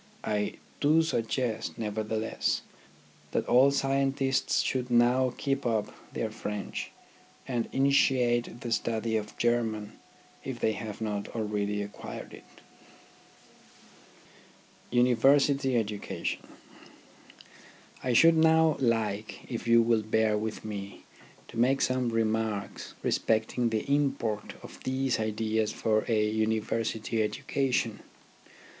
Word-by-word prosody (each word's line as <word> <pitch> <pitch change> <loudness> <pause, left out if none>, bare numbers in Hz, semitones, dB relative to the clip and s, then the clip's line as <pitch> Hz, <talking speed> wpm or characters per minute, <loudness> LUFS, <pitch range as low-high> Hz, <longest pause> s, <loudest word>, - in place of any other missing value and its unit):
I 105 -1 -1 0.3
do 155 +3 +4
suggest, 115 -5 -2
nevertheless, 110 0 -2 0.7
that - - 0
all 130 +3 +6
scientists 135 -1 +1
should 125 -1 -1
now 125 +2 +4
keep 135 0 -1
up 110 -3 -1 0.2
their - - -3
French, 105 -1 -5 0.6
and 120 -3 -1
initiate 125 -3 +2
the 120 - -5
study 115 0 0
of 105 -1 -3
German 115 -3 0 0.5
if - - -5
they 110 - +2
have 110 0 -6
not 105 -2 -2
already 105 -2 -1
acquired 105 - -8
it. - - -12 2.5
UNIVERSITY 135 +2 +4
EDUCATION 105 -3 -3 1.6
I 125 - +1
should 165 +7 +7
now 160 -1 +4
like, 110 -4 -1
if 120 -1 -4
you 115 0 +6
will 115 -1 +2
bear 110 0 +2
with 110 +1 -4
me, 100 -2 -6 0.4
to - - -10
make 130 +3 +3
some 130 -1 +1
remarks 110 -2 -2
respecting 115 +2 +1
the 110 -1 -1
import 135 -7 0
of - - -12
these 130 -1 0
ideas 110 0 0
for 110 -1 0
a 110 -2 +2
University 110 +1 -1
education. 120 +1 -1
115 Hz, 110 wpm, -29 LUFS, 110-130 Hz, 2.5 s, should